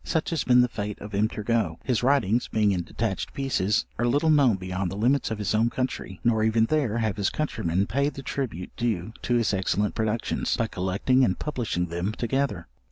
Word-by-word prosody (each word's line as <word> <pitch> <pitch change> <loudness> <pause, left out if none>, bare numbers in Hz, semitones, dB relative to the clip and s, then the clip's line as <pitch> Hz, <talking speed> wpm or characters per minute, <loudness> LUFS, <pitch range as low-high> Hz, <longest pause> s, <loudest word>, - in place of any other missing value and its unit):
Such 160 +1 -1
has 165 - 0
been 125 -1 +5
the 125 - +3
fate 105 -3 -5
of 105 0 -9
M. 105 +2 +2
Turgot: 105 -6 -1
his 125 -5 0
writings, 125 -4 +2
being 105 -2 +2
in 90 -2 0
detached 105 +3 -3
pieces, 110 -6 +1
are 120 - +2
little 145 +6 +3
known 140 -8 +5
beyond 95 0 -3
the 95 - -6
limits 125 +6 +2
of 110 - -3
his 105 0 -1
own 110 +2 +3
country; 125 -7 -4
nor 115 -2 +2
even 110 0 +3
there 130 -5 0
have 110 -4 -1
his 100 -2 +1
countrymen 100 - -1
paid 140 +6 0
the 135 - -7
tribute 120 - -4
due 110 -4 -2
to 120 - 0
his 115 -3 +2
excellent 95 +2 0
productions, 110 +1 -1
by 115 - +1
collecting 100 +7 +1
and 95 -7 +2
publishing 120 -12 -2
them 85 +4 -3
together. 120 -7 -1
110 Hz, 205 wpm, -26 LUFS, 100-125 Hz, -, been